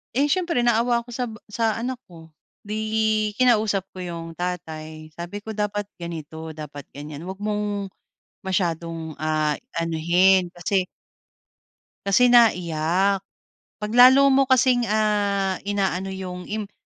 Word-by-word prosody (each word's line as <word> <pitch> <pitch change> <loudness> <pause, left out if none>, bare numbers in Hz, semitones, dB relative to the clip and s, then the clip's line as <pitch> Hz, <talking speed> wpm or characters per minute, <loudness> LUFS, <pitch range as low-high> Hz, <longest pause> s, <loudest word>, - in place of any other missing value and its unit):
Eh, 285 +2 +2
siyempre 345 -9 +1
naawa 235 0 +2
ako 240 - -18
sa 245 +1 -2
ba 220 - -8 0.2
sa 225 -1 0
anak 245 +2 -4
ko. 165 -2 -14 0.3
'Di 210 +1 -5 0.6
kinausap 220 -6 +3
ko 185 - -11
yung 170 -2 -6
tatay 160 -3 -6
sabi 175 +6 -7
ko 220 - -6
dapat 205 -1 -2 0.2
ganito, 160 -1 -7
dapat 145 -2 -9
ganyan, 150 +3 -8
'wag 190 - -5
mong 205 -2 -2 0.5
masyadong, 165 -3 -2
ah, 155 -1 0 0.2
anuhin 175 +3 +3
kasi 185 +2 0 1.2
kasi 245 +6 +4
naiyak. 190 -3 +3 0.6
'Pag 210 - -3
lalo 260 +3 +7
mo 270 0 +4
kasing, 250 -2 +3
ah, 205 -3 +1
inaano 195 -2 0
yung 185 -1 -6
imp 210 -1 -4
195 Hz, 130 wpm, -23 LUFS, 165-220 Hz, 1.2 s, lalo